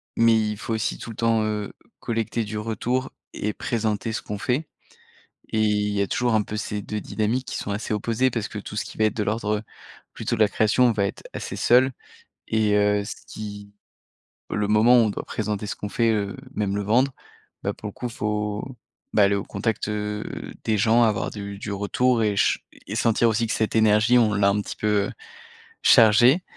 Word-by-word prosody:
mais 115 0 +5
il 105 -1 -1
faut 115 - -4
aussi 110 -2 -1
tout 115 - -8
le - - -10
temps, 115 -1 +2
heu, 105 -1 -2 0.3
collecter 115 0 -2
du 105 +1 -5
retour 115 +4 -2 0.2
et 105 +1 -2
présenter 110 0 -2
ce 115 - -3
qu'on 105 -1 -5
fait. 135 +8 -1 0.9
Et 110 - +1
il 105 -1 +1
y 100 - 0
a 100 - 0
toujours 120 +2 0
un 110 - +3
peu 105 +1 -6
ces 105 0 -3
2 105 +2 -4
dynamiques 110 +6 -1
qui - - -4
sont - - -4
assez 105 +2 -3
opposées 115 +4 +1
parce 115 -3 -2
que 105 - -7
tout 105 0 -8
ce - - -1
qui - - -11
va 110 - +3
être 110 -1 +1
de 110 - 0
l'ordre, 105 0 0
heu, 105 - -8 0.5
plutôt 120 - -2
de - - -6
la 110 - +6
création 110 +4 +3
va 100 -2 +1
être - - -6
assez - - -5
seul 125 +2 +4 0.6
et 110 -2 +2
heu, 105 0 +3
ce - - -4
qui 105 -1 -8 0.8
le 105 -1 -1
moment 110 +4 +5
où 115 - +5
on - - +1
doit - - -5
présenter 105 -1 -3
ce - - -3
qu'on 105 - -6
fait, 115 +2 +2
heu, 100 -2 -1 0.2
même 100 -2 -1
le 105 - -1
vendre, 125 +7 +3 0.5
bah - - -1
pour 105 - -8
le - - -5
coup 125 - -4
faut, 105 -2 -2 0.5
bah 105 - +5
aller 100 +1 +4
au 100 - -2
contact, 105 +2 -2
heu, 105 0 -3 0.4
des 110 -1 +1
gens 115 +4 +4
avoir 110 -3 +1
du 100 -1 -7
du 105 - -5
retour 115 +4 +1
et 105 -2 +1
ch - - +3 0.3
et 105 - -4
sentir 115 0 +3
aussi 115 +1 +1
que - - -1
cette 110 0 -1
énergie 110 +2 +5
on 110 -3 +4
l'a 100 0 +3
un 105 +1 +1
petit - - -7
peu, 105 -1 +1
heu, - - -6 0.7
chargée 120 - +6
105 Hz, 215 wpm, -24 LUFS, 105-115 Hz, 0.9 s, la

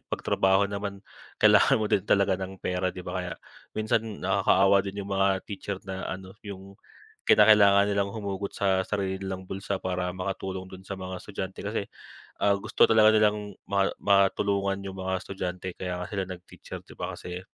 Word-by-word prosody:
'pag - - -3
trabaho 95 +1 +3
naman, 100 0 -4 0.4
kailangan 105 +5 +6
mo 110 - 0
din 105 -3 +2
talaga 100 -1 +3
ng 95 0 -6
pera, 90 0 -1
'di 90 0 -10
ba? 90 - -2
Kaya, 90 -1 -5 0.4
minsan 110 +1 +1 0.2
nakakaawa 95 +1 +4
din 100 +1 -5
'yong 100 - -9
mga 95 0 +3 0.2
teacher 100 -1 -5
na 95 0 -5
ano, 95 +1 -7
'yong, 100 -1 -9 0.5
kinakailangan 105 -1 +6
nilang 100 0 +1
humugot 100 -2 -4
sa 95 -1 +1
sarili 95 -2 -2
nilang 95 -1 -5
bulsa 95 +1 -4
para 90 -1 -2
makatulong 95 0 -4
do'n 95 0 -10
sa 95 - -4
mga 95 -1 -5
estudyante, 95 -2 -6
kasi, 100 0 -2 0.6
ah, 100 - +5
gusto - - +2
talaga 110 -1 +6
nilang 105 -2 +1
ma 100 -1 +2
matulungan 100 0 +2
'yong 95 -1 -6
mga 95 0 -3
estudyante, 90 -1 -5
kaya 90 -1 -3
nga - - -6
sila 100 -2 -1
nag-teacher, 90 -1 -9
'di - - -12
ba, - - -3
kasi 90 0 -7
95 Hz, 175 wpm, -27 LUFS, 95-100 Hz, 0.6 s, kailangan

